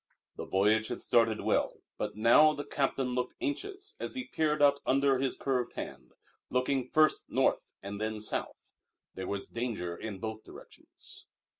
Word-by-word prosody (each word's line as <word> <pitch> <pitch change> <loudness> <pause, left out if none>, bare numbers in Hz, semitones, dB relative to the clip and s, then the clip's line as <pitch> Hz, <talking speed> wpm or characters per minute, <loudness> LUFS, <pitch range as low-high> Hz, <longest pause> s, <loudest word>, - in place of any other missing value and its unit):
The - - -6
voyage 105 +3 +3
had 120 - -4
started 115 -2 +3
well, - - +1 0.2
but - - -3
now 120 +8 +6
the 145 - -5
captain 135 -2 0
looked 125 0 -2
anxious 385 +6 -4
as - - -4
he 260 - -3
peered 155 -8 0
out 140 -1 +5
under 135 0 +3
his 135 -1 0
curved 130 -3 -1
hand, 65 -2 -7 0.4
looking 130 0 0
first 155 0 +3
south - - +2 0.2
and 100 +1 -6
then 110 0 -1 0.2
north. - - -2 0.6
There 95 -1 -5
was 100 -1 -3
danger 110 -8 -3
in 105 +1 -6
both 110 +2 -5
directions. - - -13
125 Hz, 160 wpm, -31 LUFS, 110-145 Hz, 0.6 s, now